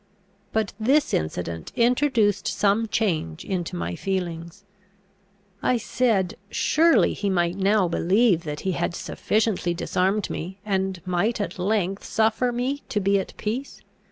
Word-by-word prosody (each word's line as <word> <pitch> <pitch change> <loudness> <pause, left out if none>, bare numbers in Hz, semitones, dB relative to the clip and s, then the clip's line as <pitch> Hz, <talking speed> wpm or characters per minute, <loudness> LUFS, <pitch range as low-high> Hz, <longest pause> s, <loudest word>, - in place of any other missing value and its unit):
But 220 -2 -1
this 270 +7 +2
incident 80 +1 -3
introduced 235 -4 +2
some 210 +3 +2
change 165 - -1
into 180 -3 -3
my 85 0 -3
feelings. 180 - -4 1.0
I 250 - +2
said, 215 -5 0
"Surely 330 +7 +3
he 200 - -2
might 175 -2 +1
now 195 0 +3
believe 185 +2 +2
that 150 -2 -5
he 190 - -1
had 175 - -2
sufficiently 210 -5 0
disarmed 190 +4 0
me, 185 +4 -5
and 190 -3 -1
might 185 +6 0
at 205 -2 -4
length 195 0 0
suffer 225 +3 +1
me 255 +4 -2
to 210 - 0
be 200 0 +2
at 190 - -7
peace. 245 +6 -4
195 Hz, 135 wpm, -24 LUFS, 180-225 Hz, 1.0 s, Surely